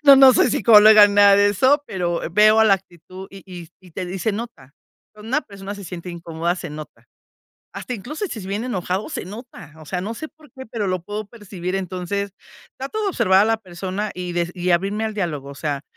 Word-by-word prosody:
No, 280 Hz, -1 st, +10 dB
no 265 Hz, -1 st, +8 dB
soy 250 Hz, -, +3 dB
psicóloga 210 Hz, 0 st, +7 dB
ni 200 Hz, -, -3 dB
nada 200 Hz, -1 st, +7 dB
de 205 Hz, 0 st, +4 dB
eso, 260 Hz, +9 st, +3 dB
pero 175 Hz, -2 st, -2 dB
veo, 215 Hz, +3 st, +5 dB
ah, -, -, +6 dB
la 200 Hz, -3 st, +5 dB
actitud, 185 Hz, 0 st, -11 dB
y 195 Hz, -1 st, -12 dB
y 175 Hz, -3 st, -10 dB
y 185 Hz, -, -17 dB
te 180 Hz, +2 st, -5 dB
dis 180 Hz, -, -5 dB
y -, -, -5 dB
se 220 Hz, -, 0 dB
nota. 205 Hz, -, -8 dB, 0.4 s
Cuando 215 Hz, +1 st, -12 dB
una 270 Hz, +5 st, +1 dB
persona 200 Hz, -4 st, -9 dB
se 200 Hz, -, -10 dB
siente 175 Hz, +1 st, -7 dB
incómoda, 170 Hz, 0 st, -3 dB
se 175 Hz, -, -7 dB
nota. 150 Hz, 0 st, -11 dB, 0.7 s
Hasta -, -, -6 dB
incluso 300 Hz, -, -5 dB
si 245 Hz, -, -7 dB
es 185 Hz, -, -9 dB
bien 205 Hz, +4 st, -3 dB
enojado, 190 Hz, -, -3 dB
se -, -, -5 dB
nota, 210 Hz, -, -11 dB
o -, -, -12 dB
sea, 180 Hz, +4 st, -4 dB
no 210 Hz, +5 st, -5 dB
sé 315 Hz, +7 st, -7 dB
por 305 Hz, -3 st, -21 dB
qué, 260 Hz, -, -10 dB
pero 220 Hz, -3 st, -3 dB
lo 185 Hz, -1 st, -1 dB
puedo 210 Hz, +3 st, -6 dB
percibir. 195 Hz, -4 st, -6 dB
Entonces, 190 Hz, +2 st, -4 dB, 0.5 s
trato 275 Hz, +12 st, -4 dB
de 405 Hz, -, 0 dB
observar 190 Hz, -, +3 dB
a -, -, +3 dB
la 225 Hz, 0 st, +1 dB
persona 190 Hz, +2 st, -5 dB
y 180 Hz, -1 st, -5 dB
de 175 Hz, -, 0 dB
s 170 Hz, +1 st, -5 dB
y 180 Hz, 0 st, -2 dB
abrirme 195 Hz, +5 st, 0 dB
al 220 Hz, -1 st, -3 dB
diálogo, 155 Hz, -9 st, -4 dB
o -, -, -10 dB
sea, 145 Hz, -1 st, -3 dB
195 Hz, 235 wpm, -21 LUFS, 180-220 Hz, 0.7 s, No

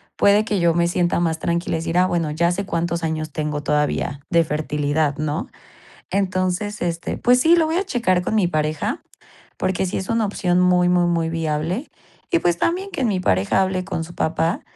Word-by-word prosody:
puede 205 Hz, +1 st, +4 dB
que 210 Hz, -3 st, 0 dB
yo 170 Hz, -1 st, +4 dB
me 170 Hz, +1 st, +2 dB
sienta 175 Hz, 0 st, +1 dB
más 165 Hz, -2 st, 0 dB
tranquila 170 Hz, 0 st, -1 dB
y -, -, -3 dB
decir: 165 Hz, +1 st, -2 dB
"Ah, 180 Hz, -, +5 dB
bueno, 170 Hz, -4 st, -1 dB
ya 170 Hz, +3 st, +1 dB
sé 200 Hz, +3 st, -2 dB
cuántos 170 Hz, -1 st, -2 dB
años 155 Hz, -1 st, -2 dB
tengo 150 Hz, 0 st, -3 dB
todavía 150 Hz, -1 st, 0 dB
de 170 Hz, -1 st, +4 dB
fertilidad", 150 Hz, -1 st, -1 dB
¿no?, 155 Hz, +4 st, -2 dB, 0.6 s
entonces, 190 Hz, +1 st, -1 dB
este, 170 Hz, -1 st, -3 dB
pues 250 Hz, +1 st, +4 dB
sí, 325 Hz, +5 st, +5 dB
lo 330 Hz, -2 st, +3 dB
voy 320 Hz, +1 st, -1 dB
a 385 Hz, -, +1 dB
checar 230 Hz, -, +1 dB
con 200 Hz, -, -2 dB
mi 210 Hz, -4 st, +3 dB
pareja 155 Hz, -2 st, -2 dB, 0.6 s
porque 190 Hz, 0 st, -1 dB
sí -, -, -3 dB
es 190 Hz, -, -4 dB
una 230 Hz, -1 st, +1 dB
opción 180 Hz, -3 st, 0 dB
muy, 180 Hz, -1 st, +4 dB
muy, 180 Hz, 0 st, +3 dB
muy 165 Hz, -1 st, 0 dB
viable 165 Hz, -, -2 dB, 0.4 s
y 345 Hz, -, +4 dB
pues 175 Hz, -1 st, +1 dB
también 375 Hz, +4 st, -1 dB
que 270 Hz, -, -2 dB
mi 205 Hz, -6 st, +1 dB
pareja 100 Hz, -, +2 dB
hable 185 Hz, -1 st, -2 dB
con 180 Hz, -3 st, -3 dB
su 170 Hz, +2 st, -10 dB
papá 165 Hz, +1 st, 0 dB
175 Hz, 205 wpm, -21 LUFS, 160-190 Hz, 0.6 s, Ah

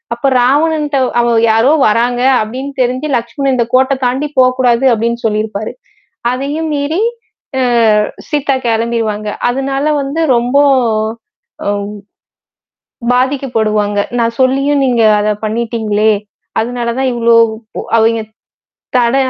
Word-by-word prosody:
அப்ப 255 Hz, +3 st, 0 dB
ராவணன்ட்ட 295 Hz, +2 st, +1 dB, 0.2 s
அவ 235 Hz, 0 st, +1 dB, 0.2 s
யாரோ 225 Hz, +6 st, +3 dB, 0.2 s
வராங்க 240 Hz, +3 st, +1 dB, 0.2 s
அப்பிடின்னு 260 Hz, +6 st, -6 dB
தெரிஞ்சு 255 Hz, +4 st, -1 dB
லட்சுமணன், 260 Hz, +3 st, -2 dB
இந்த 240 Hz, -2 st, +1 dB
கோட்ட 260 Hz, +2 st, +3 dB
தாண்டி 265 Hz, +4 st, -1 dB
போ 260 Hz, -, +6 dB
கூடாது 245 Hz, 0 st, +2 dB
அப்பிடின்னு 235 Hz, +1 st, -2 dB
சொல்லியிருப்பாரு. 215 Hz, -1 st, -2 dB, 0.6 s
அதையும் 290 Hz, +5 st, -3 dB
மீறி, 290 Hz, +6 st, -1 dB, 0.6 s
அ -, -, +1 dB, 0.7 s
சீதா 290 Hz, -2 st, 0 dB
கிளம்பிருவாங்க. 225 Hz, -2 st, -1 dB, 0.2 s
அதனால 270 Hz, +2 st, -2 dB, 0.2 s
வந்து 280 Hz, +4 st, -3 dB
ரொம்ப. 245 Hz, +3 st, +1 dB, 1.1 s
ஒவ் 205 Hz, 0 st, -2 dB, 1.2 s
பாதிக்கப்படுவாங்க. 225 Hz, -6 st, 0 dB, 0.2 s
நான் 230 Hz, 0 st, 0 dB
சொல்லியும் 275 Hz, +2 st, +2 dB
நீங்க 245 Hz, -2 st, +1 dB, 0.2 s
அத 205 Hz, -, -1 dB, 0.2 s
பண்ணிட்டீங்களே! 220 Hz, -1 st, 0 dB, 0.5 s
அதனால 240 Hz, +1 st, -2 dB
தான் 265 Hz, -1 st, +1 dB
இவ்ளோ 235 Hz, -1 st, +3 dB, 0.6 s
அவெங்க, 225 Hz, 0 st, +2 dB, 0.8 s
தட 240 Hz, +1 st, +2 dB
245 Hz, 110 wpm, -13 LUFS, 225-275 Hz, 1.2 s, போ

